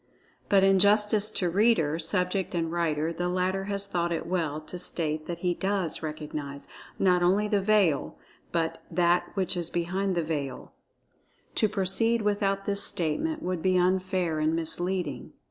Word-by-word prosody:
But 195 -1 +5
in 195 0 +5
justice 210 +1 +3
to 185 -4 -1
reader, 175 -5 +2
subject 180 +2 0
and 165 -1 -1
writer, 165 -1 0
the 175 +1 -2
latter 185 +1 0
has 200 0 0
thought 175 -3 -1
it 165 - -2
well 165 -4 -1
to 175 +3 -8
state 155 -3 -2
that 175 - -4
he 175 - +3
does 190 -2 -2
recognize, 150 -2 -6 0.3
not 180 -2 +3
only 195 +4 +3
the 205 -2 +1
veil, 195 -7 +2 0.3
but 165 -1 -1
That 175 +1 +2
which 190 -2 0
is 170 -2 -3
behind 185 +3 -1
the 170 - +1
Veil. 145 -5 -4 0.8
To 215 - +2
proceed 215 +4 +1
without 200 -1 0
this 200 0 0
statement 300 - -1
would 180 -2 -2
be 185 0 +2
unfair 185 -2 +1
and 155 +1 +1
misleading. 165 -3 -2
180 Hz, 160 wpm, -27 LUFS, 165-195 Hz, 0.8 s, But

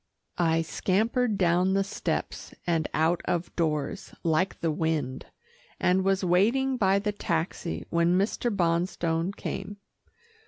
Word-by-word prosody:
I 165 -1 +3
scampered 215 +6 0
down 180 +1 +3
the 195 - +3
steps 195 - -4
and 165 -3 +1
out 165 +2 +1
of 175 0 -2
doors 160 +3 -2
like 170 +3 +1
the 165 -1 0
wind, 150 -5 -2 0.5
and 185 +1 +3
was 195 0 +1
waiting 230 +10 +3
by 195 -5 +3
the 210 +1 -1
taxi 170 -3 -3
when 170 +1 +3
Mr. 210 +5 0
Bonstone 170 -2 0
came. 205 - -5
180 Hz, 125 wpm, -27 LUFS, 165-195 Hz, 0.5 s, I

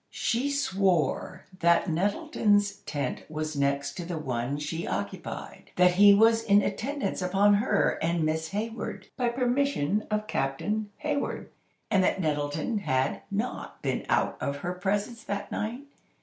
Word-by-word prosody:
She 245 +4 0
swore 190 - 0
that 170 +2 +4
Nettleton's 205 +3 +1
tent 145 -2 -2
was 155 0 -3
next 140 0 0
to 175 - -3
the 170 -1 -4
one 130 -2 -2
she 160 +3 -4
occupied—that 100 - -1
he 200 +3 +7
was 225 +2 +5
in 205 -2 +4
attendance 270 -5 -2
upon 195 +3 +4
her 210 +5 +2
and 170 0 +1
Miss 160 +1 0
Hayward, 210 -2 -4
by 245 -2 +1
permission 245 - 0
of 210 0 -1
Captain 210 +8 -1
Hayward, 290 -1 -3 0.4
and 195 -3 +4
that 185 - +1
Nettleton 150 +5 -1
had 130 -8 0
not 210 +5 -4
been - - -1
out - - +1
of 140 - -1
her 180 - -1
presence 200 +5 -2
that 200 0 -4
night. 230 +5 -3
195 Hz, 140 wpm, -28 LUFS, 155-215 Hz, 0.4 s, he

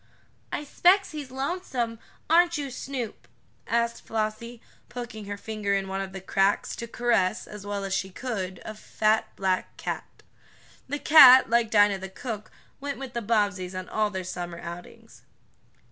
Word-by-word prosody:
"I - - -3
'specs 365 +7 +3
he's 295 -4 -6
lonesome; 260 -5 -3 0.3
aren't 340 +1 +4
you, 280 -2 -4
Snoop?" 250 -3 -6 0.4
asked 235 0 0
Flossie, 225 +2 -3 0.3
poking 240 -4 -7
her 205 0 -5
finger 210 -1 -2
in 195 -1 -1
one 195 0 -3
of 190 -1 -5
the 190 - -7
cracks, 195 +1 +1
to 235 - -5
caress, 230 -5 +1
as 205 -1 -10
well 205 -1 -3
as 195 - -3
she 190 0 -1
could, 190 -4 -4
a 215 - -5
fat, 215 0 0
black 190 -1 -1
cat. - - -6 0.7
The 290 - -1
cat, 260 -6 +8
like 235 -1 +3
Dinah 205 -2 +4
the 190 0 -7
cook, 215 +2 -6 0.3
went 280 0 -4
with 265 -2 -7
the 235 - -2
Bobbseys 200 -4 0
on 185 0 -5
all 215 -1 +1
their 190 -2 -4
summer 175 -1 -5
outings. 170 +1 -10
220 Hz, 160 wpm, -26 LUFS, 195-250 Hz, 0.7 s, cat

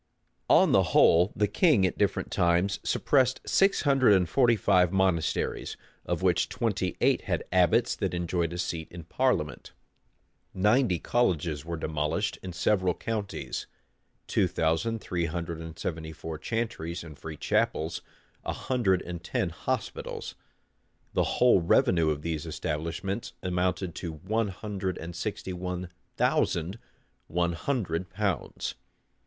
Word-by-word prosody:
On - - +6
the - - +6 0.2
whole, 85 +4 +6
the 105 - +2
king 130 - +4
at 90 - 0
different 100 -1 0
times 90 +2 +2
suppressed 130 -2 +2
six 195 +1 +3
hundred 135 -7 +5
and 90 -3 +3
forty 120 +4 +4
five 90 -4 +3
monasteries; 95 -4 0 0.3
of - - -1
which - - +2
twenty - - -1
eight - - +3
had - - -1
abbots 95 +7 +3
that 95 -4 -1
enjoyed 85 -1 -1
a 85 - -5
seat 85 -2 -3
in 85 -1 -8
parliament. 90 -4 -1 0.8
Ninety 105 +1 +3
colleges 85 - 0
were 85 0 -4
demolished 75 -1 -1
in 95 - -6
several 90 +1 +1
counties; 110 -4 -4 0.6
two - - +2
thousand 100 +8 0
three 85 -2 -2
hundred 85 0 -4
and 80 0 -8
seventy 80 -1 -4
four 80 -1 -7
chantries 90 -6 -3
and 80 -3 -10
free 80 +1 -8
chapels; 80 +3 0 0.4
a - - -2
hundred 105 -8 +1
and 85 -1 -7
ten 90 - -1
hospitals. 80 - -4 0.8
The - - +2
whole 125 -7 +5
revenue 85 -1 +3
of 75 -1 -2
these 80 -3 -3
establishments 85 +7 -3
amounted 90 0 -1
to 85 -3 -4
one 105 +8 -1
hundred 95 -1 -4
and 85 +1 -7
sixty 95 - -4
one 90 0 -4 0.3
thousand 90 +6 +1 0.5
one 85 +1 0
hundred 95 -5 -2
pounds. 100 -8 -2
90 Hz, 135 wpm, -28 LUFS, 85-105 Hz, 0.8 s, On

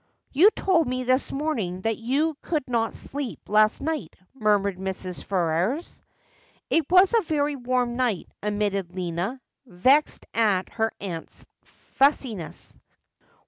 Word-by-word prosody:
' - - -50
You 340 +10 +7
told 340 -6 +2
me 255 0 -2
this 255 +2 +1
morning 230 - -2
that 225 +2 0
you 285 +7 0
could 305 -6 -2
not 230 -2 0
sleep 280 -4 -5
last 215 +3 +3
night,' 315 +1 -3 0.2
murmured 205 -6 +1
Mrs. 190 -1 -5
Ferrers. 185 - -1 0.3
' - - -34
It 325 -3 +2
was 370 +4 +6
a 460 - +5
very 295 -4 0
warm 245 -1 -1
night,' 240 -8 -1
admitted 200 -3 -1
Lina, 180 +7 -3 0.3
vexed 255 +11 +2
at 205 -5 +2
her 225 -1 -1
aunt's 175 -5 -7 0.2
f - - -30
ussiness. 260 - 0
235 Hz, 140 wpm, -25 LUFS, 195-285 Hz, 0.3 s, You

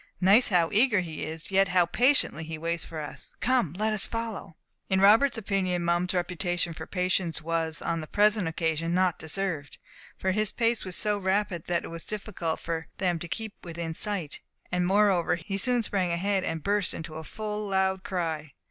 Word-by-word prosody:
Notice 200 +7 +6
how 175 -4 +3
eager 215 -2 +4
he 160 -3 -6
is, 160 +4 -6
yet 195 0 +4
how 180 -1 +3
patiently 245 - +3
he 160 0 -6
waits 165 +1 -2
for 160 - -7
us. 150 - -7
Come, 240 - +1
let 215 +4 0
us 210 - +2
follow." 225 -7 -5 0.3
In 190 - +2
Robert's 225 +7 +5
opinion, 190 -4 -1
Mum's 175 +2 +1
reputation 175 -1 -1
for - - -8
patience 180 -3 0
was, 165 -1 -2
on 165 - -1
the 155 - -8
present 210 -1 +3
occasion, 165 +1 -1
not 185 -2 +2
deserved; 160 -3 -2 0.4
for 190 - 0
his 215 +2 +1
pace 230 -1 +1
was 185 -2 -3
so 210 -1 +2
rapid 190 -3 0
that 175 -1 0
it - - -7
was 165 0 -7
difficult 200 -6 -3
for 165 -1 -4
them 180 -3 0
to 175 - -5
keep 220 +4 -4
within 170 -1 -5
sight, 185 -5 -3 0.3
and 180 0 +1
moreover 195 -3 +3
he 175 +4 -5
soon 245 +2 +3
sprang 190 -4 0
ahead, 190 +3 0
and 165 -4 -3
burst 205 -1 0
into 160 -1 -7
a 160 +1 -6
full 210 +3 -4
loud 190 -1 +1
cry. 160 -5 -3
180 Hz, 190 wpm, -27 LUFS, 165-205 Hz, 0.4 s, Notice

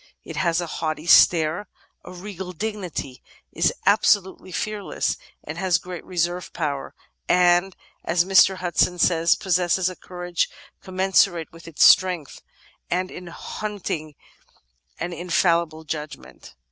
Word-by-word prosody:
It - - -9
has 170 -1 +1
a 175 - -2
haughty 155 -1 -4
stare, 170 +2 +5 0.4
a - - -11
regal 185 0 -8
dignity, 180 -9 -5 0.3
is - - +2
absolutely 200 -2 +2
fear 210 +4 -3
less, - - -1 0.3
has 175 +3 0
great 180 0 -8
reserve 175 0 -2
power, 145 -4 -3 0.3
and, 180 +1 +3 0.3
as 170 +1 +1
Mr. 190 0 +5
Hudson 180 0 0
says, 165 -1 +3
possesses 185 -1 +1
a - - -10
courage 175 -1 -3 0.3
commensurate 185 -3 +1
with 165 0 -14
its 165 - +1
strength, 180 -6 +4 0.5
and 185 +1 -1
in 180 0 -9
hunting 170 -5 -5 0.8
an 175 +1 -3
in 175 +2 -7
fallible 170 -2 +1
judgment. 150 - -8
175 Hz, 125 wpm, -23 LUFS, 165-185 Hz, 0.8 s, stare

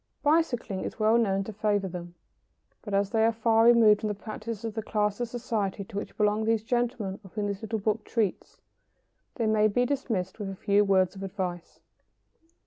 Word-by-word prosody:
Bicycling 290 - +1
is - - -5
well 220 +1 +3
known 195 -3 +1
to 220 - -7
favour 205 -1 0
them. 175 -1 -8 0.7
But 205 -3 -3
as 200 0 +1
they 220 -2 +2
are 225 - +4
far 225 0 +3
removed 225 -3 +6
from 215 - -2
the 210 - -2
practices 215 +1 -6
of 225 - -3
the 220 - -3
class 210 -1 -1
of 240 -1 -2
society 225 -5 -2
to 195 +1 -13
which 205 - -6
belong 210 0 +2
those 225 -1 +1
gentlemen 235 -5 -1
of 190 - -15
whom 210 -1 -1
this 200 -1 -3
little 220 0 -2
book 215 +1 -1
treats, 215 -5 -2 0.8
they 230 - -1
may 215 0 +4
be 245 +4 +1
dismissed 230 -9 -2
with 205 -2 -4
a 195 - -6
few 200 +2 +2
words 190 -2 +2
of 195 - -9
advice. 185 -3 -5
210 Hz, 200 wpm, -28 LUFS, 195-225 Hz, 0.8 s, removed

